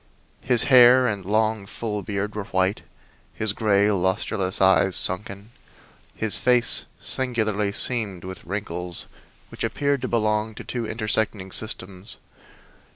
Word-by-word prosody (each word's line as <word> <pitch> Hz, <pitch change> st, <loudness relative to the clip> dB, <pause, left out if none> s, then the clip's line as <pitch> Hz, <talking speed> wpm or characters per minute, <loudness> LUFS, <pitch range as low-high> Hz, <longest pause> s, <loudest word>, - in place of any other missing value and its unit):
His 120 Hz, -3 st, +2 dB
hair 125 Hz, -1 st, +7 dB
and 105 Hz, -5 st, -1 dB
long, 110 Hz, +1 st, 0 dB
full 105 Hz, 0 st, -4 dB
beard 105 Hz, 0 st, -3 dB
were 105 Hz, -2 st, -4 dB
white, 95 Hz, +1 st, 0 dB, 0.5 s
his 110 Hz, -2 st, -1 dB
gray, 105 Hz, -1 st, +2 dB
lustreless 95 Hz, 0 st, -1 dB
eyes 95 Hz, 0 st, +4 dB
sunken, 100 Hz, +3 st, -2 dB, 0.6 s
his 110 Hz, -2 st, 0 dB
face 125 Hz, -1 st, +3 dB
singularly 110 Hz, -5 st, 0 dB
seamed 100 Hz, -5 st, -1 dB
with 95 Hz, 0 st, -8 dB
wrinkles 90 Hz, -3 st, -5 dB, 0.4 s
which -, -, -7 dB
appeared 140 Hz, -2 st, 0 dB
to -, -, -2 dB
belong 110 Hz, -1 st, 0 dB
to -, -, -8 dB
two 120 Hz, -3 st, -4 dB
intersecting 110 Hz, -3 st, -1 dB
systems. 95 Hz, -2 st, -5 dB
105 Hz, 125 wpm, -24 LUFS, 95-110 Hz, 0.6 s, hair